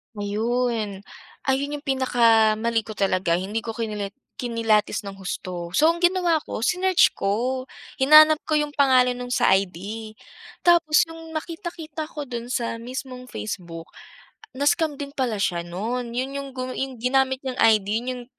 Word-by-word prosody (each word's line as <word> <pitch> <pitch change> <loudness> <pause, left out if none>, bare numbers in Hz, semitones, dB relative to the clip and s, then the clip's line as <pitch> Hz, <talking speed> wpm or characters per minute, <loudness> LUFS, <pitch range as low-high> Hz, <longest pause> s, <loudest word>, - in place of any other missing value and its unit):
Ayun. 215 -1 -1 0.4
Ayun 280 +2 0
yung 290 - -9
pinakamali 230 -4 +2
ko 215 - -7
talaga 185 -4 +1
hindi 195 +5 -2
ko 225 0 -6
kinila 210 -3 -3 0.3
kinilatis 225 -4 +1
ng 195 - -7
husto. 180 -2 -6
So, 310 - +5
ang 340 - -6
ginawa 350 -3 +3
ko - - -5
sinearch 370 +4 +3
ko, 245 +6 -1 0.4
hinanap 305 +3 +7
ko 310 - +1
yung 295 0 -2
pangalan 255 -3 +4
nung 245 0 -6
sa - - +3
ID 190 -2 +2 0.9
tapos 335 -3 +5
nung 325 0 -11
nakita-kita 325 -2 -6
ko 300 -2 -6
dun 240 -1 -5
sa 235 -2 -1
mismong 255 +1 -7
Facebook, 170 -8 -6 0.7
na-scam 290 +1 +1
din 280 0 -5
pala 245 -5 0
siya 175 -4 0
nun. 235 +7 -4
Yun 265 +2 -2
yung 275 0 -5
gu 255 0 -4 0.3
ginamit 265 +1 +1
niyang 260 -1 -3
ID 215 -3 +4
yun 245 - -10
yung 245 -1 -7
250 Hz, 150 wpm, -24 LUFS, 215-285 Hz, 0.9 s, hinanap